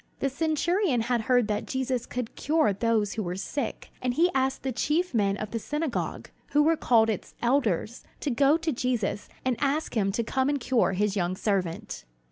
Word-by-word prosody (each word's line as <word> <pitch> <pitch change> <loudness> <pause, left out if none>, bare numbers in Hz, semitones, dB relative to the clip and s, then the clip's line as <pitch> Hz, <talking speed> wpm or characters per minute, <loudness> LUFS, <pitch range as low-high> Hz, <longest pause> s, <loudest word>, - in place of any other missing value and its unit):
The 275 - +1
centurion 320 - +1
had 235 0 0
heard 245 0 +3
that 210 -1 -2
Jesus 260 -2 -2
could 250 -2 -4
cure 300 -9 +2
those 215 0 +1
who 220 - -2
were 180 -2 -3
sick; 230 +5 -4
and 250 -1 -1
he 350 +4 +4
asked 265 0 0
the 265 - -1
chief 305 +8 0
men 200 -3 +2
of 215 0 -5
the 230 - -2
synagogue, 295 +2 -3 0.2
who 295 +1 +5
were 325 +2 +4
called 230 -7 +4
its 220 -4 -3
"elders," 235 -4 +1 0.2
to 290 - -1
go 280 +5 +4
to 325 -1 -1
Jesus 240 -5 -1 0.2
and 255 -1 +2
ask 290 +1 0
him 195 -3 +2
to 235 - 0
come 265 +4 0
and 285 -1 0
cure 245 -5 +2
his 205 +1 0
young 180 -2 0
servant. 185 - -2
245 Hz, 195 wpm, -27 LUFS, 215-285 Hz, 0.2 s, who